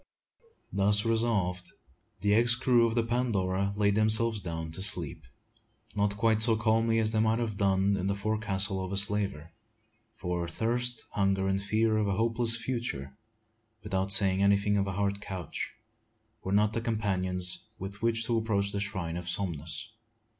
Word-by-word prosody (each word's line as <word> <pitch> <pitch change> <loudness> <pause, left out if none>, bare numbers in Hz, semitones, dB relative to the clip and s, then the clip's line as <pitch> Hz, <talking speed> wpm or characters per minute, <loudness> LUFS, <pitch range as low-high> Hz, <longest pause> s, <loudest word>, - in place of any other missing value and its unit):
Thus 105 +2 +3
resolved, 110 -6 0 0.5
the 105 +1 +2
ex 115 +2 +5
crew 120 -2 +3
of 115 - -3
the 115 - +2
Pandora 100 -5 -1
laid 100 -1 +2
themselves 110 +1 +3
down 80 -3 -5
to 95 - -4
sleep, 90 -7 0 0.7
not 100 -1 0
quite 110 0 +2
so 110 0 +5
calmly 115 +1 +1
as 110 -1 +2
they 110 - 0
might 110 +1 +2
have 115 -3 -3
done 100 0 +1
in 95 -1 -2
the 100 - 0
forecastle 100 -2 -1
of 95 - -5
the 100 - -2
slaver; 100 -5 +1 0.6
for 90 -2 -3
thirst, 120 +6 -1
hunger, 95 -1 0
and 95 0 0
fears 110 +1 +1
for 105 - 0
a 100 - 0
hopeless 115 +1 +1
future, 115 - -4 0.7
without 95 0 -2
saying 95 -1 +5
anything 100 +1 +2
of 100 -1 0
a 95 - -3
hard 100 +1 -1
couch, 95 -1 -6 0.7
were 95 - -4
not 105 +1 +2
the 115 - -2
companions 95 -5 -1
with 100 +2 -8
which 115 0 +1
to 115 -1 +1
approach 100 -3 -1
the 100 - -3
shrine 95 -5 -3
of 90 0 -5
Somnus. 85 +3 -2
100 Hz, 165 wpm, -29 LUFS, 95-115 Hz, 0.7 s, ex